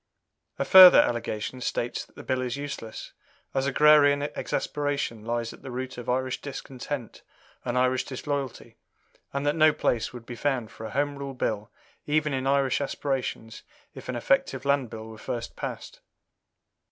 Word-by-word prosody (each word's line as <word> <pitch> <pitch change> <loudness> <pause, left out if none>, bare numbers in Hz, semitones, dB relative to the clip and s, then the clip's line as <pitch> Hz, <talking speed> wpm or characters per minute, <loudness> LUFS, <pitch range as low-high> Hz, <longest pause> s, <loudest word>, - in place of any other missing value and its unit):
A - - -1
further 185 -2 +10
allegation 120 +1 -1
states 120 0 -2
that - - -28
the - - -10
Bill 130 -1 -1
is 125 +1 -3
useless, 140 -6 -7 0.4
as 135 0 0
agrarian 145 0 +5
exasperation 145 -6 -2
lies 115 0 -2
at - - -15
the 135 - -8
root 130 0 -5
of 120 - -6
Irish 130 +1 -1
discontent 135 -2 -6 0.4
and 120 +1 -2
Irish 130 0 +2
disloyalty, 140 -1 -5 0.5
and 140 +1 -3
that 145 +1 +2
no 155 -1 +6
place 115 -5 0
would 120 -2 -10
be 120 - -7
found 125 -4 -1
for 110 - -8
a - - -8
Home 145 +1 -1
Rule 140 -1 -5
Bill 105 -4 -2 0.4
even 150 0 +1
in 130 0 -1
Irish 140 -1 +2
aspirations 135 -5 -3 0.3
if - - -10
an 125 - -2
effective 135 +2 +1
Land 140 -3 +2
Bill 110 0 -8
were 110 -1 -11
first 120 +1 -5
passed. - - -7
130 Hz, 165 wpm, -27 LUFS, 120-140 Hz, 0.5 s, further